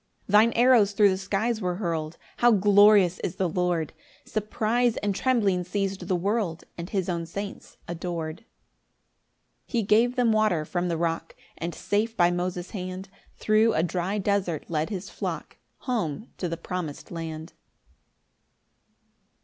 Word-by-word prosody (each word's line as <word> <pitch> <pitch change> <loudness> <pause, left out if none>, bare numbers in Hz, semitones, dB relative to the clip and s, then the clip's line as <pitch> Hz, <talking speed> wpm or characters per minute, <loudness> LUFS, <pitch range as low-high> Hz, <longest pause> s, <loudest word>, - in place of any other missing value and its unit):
9 - - -7 0.2
Thine 235 - -2
arrows 235 -5 +5
thro' 205 0 +5
the 190 - +1
skies 210 +4 -1
were 180 -2 -1
hurl'd; 165 -4 -3 0.2
How 240 - +5
glorious 205 -3 +5
is 170 - -3
the 190 - 0
Lord! 175 -2 -1 0.3
Surprise 220 +2 0
and 205 -1 -1
trembling 200 -6 +1
seiz'd 195 0 -3
the 185 - +1
world, 190 -2 -1
And 170 +1 -7
his 190 -4 -1
own 170 -2 -2
saints 200 +4 -7
ador'd. 170 -2 -4
10 225 - -24 1.2
He 235 -3 0
gave 230 +5 +3
them 245 -3 +3
water 215 -8 +2
from 175 +2 -2
the 170 -2 -1
rock; 165 0 -2 0.2
And 170 +1 -5
safe 220 +3 -1
by 175 0 +4
Moses' 180 0 -3
hand 185 0 -6 0.3
Thro' 220 +1 +3
a 160 - +2
dry 180 +3 -1
desert 195 -5 -1
led 155 +1 0
his 195 -1 -5
flock - - -5 0.2
Home 220 - -3
to 180 - -2
the 165 - -3
promis'd 170 -3 -6
land. 160 -1 -6
190 Hz, 150 wpm, -26 LUFS, 170-215 Hz, 1.2 s, arrows